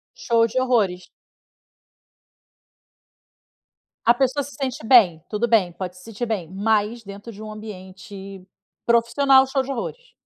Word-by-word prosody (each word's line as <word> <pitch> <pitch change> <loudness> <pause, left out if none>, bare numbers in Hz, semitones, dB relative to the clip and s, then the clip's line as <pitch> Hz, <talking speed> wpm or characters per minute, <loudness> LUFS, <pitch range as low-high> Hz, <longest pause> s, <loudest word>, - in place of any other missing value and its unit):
Show 230 -1 +2
de 255 +3 -1
horrores. 210 -8 0 3.0
A 235 - +6
pessoa 265 +3 0
se 285 - -10
sente 255 -4 -3
bem. 190 -11 +5
Tudo 225 +3 -1
bem, 205 -6 +3
pode 180 +1 -7
se 180 - -15
sentir 225 +1 -5
bem, 200 -8 -3
mas 215 +3 0
dentro 200 +3 -10
de 210 - -12
um 215 - -7
ambiente 195 -2 -10 0.4
profissional, 265 +3 +4
show 265 0 0
de 275 - -5
horrores. 480 - -6
220 Hz, 135 wpm, -22 LUFS, 195-245 Hz, 3.0 s, A